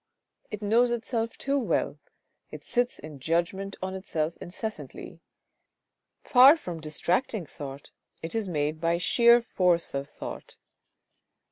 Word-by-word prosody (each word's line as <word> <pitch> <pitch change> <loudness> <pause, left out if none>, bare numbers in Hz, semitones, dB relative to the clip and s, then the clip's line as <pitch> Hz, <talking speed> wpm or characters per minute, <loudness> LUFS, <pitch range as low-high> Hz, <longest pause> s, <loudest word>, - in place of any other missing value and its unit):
It 210 0 -6
knows 230 +4 +4
itself 230 -1 -2
too 280 +1 0
well, 250 - -1 0.5
it - - -9
sits 245 0 0
in 150 -2 -10
judgment 170 +7 -1
on 190 0 -3
itself 170 -4 -2
incessantly; 215 +5 -7 1.0
far 270 +4 +8
from 175 - -6
distracting 175 - -1
thought 140 -2 -9 0.3
it 165 - -4
is 220 -4 -1
made 155 -1 -1
by 170 0 +2
sheer 235 +6 +5
force 180 -6 +1
of 140 +1 -3
thought. - - -8
190 Hz, 125 wpm, -27 LUFS, 160-235 Hz, 1.0 s, far